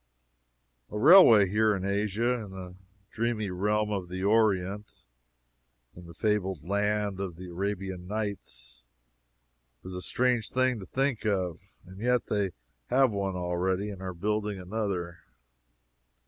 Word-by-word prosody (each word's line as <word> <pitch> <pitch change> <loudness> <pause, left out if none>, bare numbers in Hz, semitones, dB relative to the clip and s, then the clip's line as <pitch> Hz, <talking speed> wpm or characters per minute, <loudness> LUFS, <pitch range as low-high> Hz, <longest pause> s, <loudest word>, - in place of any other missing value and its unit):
A 105 - -5
railway 115 - +8
here 105 +2 +2
in 95 -1 -4
Asia 105 +4 0
in 105 - -9
the 95 -1 -8 0.4
dreamy 110 -3 -1
realm 105 +3 0
of 95 -4 -3
the 95 +1 -4
Orient 105 -1 +2 1.1
in 85 0 -12
the 85 - -12
fabled 95 -6 -1
land 105 0 0
of 95 -4 -4
the 90 +1 -9
Arabian 95 0 -4
Nights 95 - -5 1.0
is 95 - -7
a 90 - -5
strange 125 +2 0
thing 130 -2 +1
to 95 - -9
think 135 -3 -1
of. 95 -3 -2 0.2
And 95 +1 -12
yet 125 +2 +1
they 100 -2 0 0.4
have 130 -2 +4
one 100 -2 -2
already, 90 +3 -1
and 95 -2 -9
are 95 -1 -5
building 105 +2 -2
another. 90 -3 -3
100 Hz, 135 wpm, -28 LUFS, 90-105 Hz, 1.1 s, railway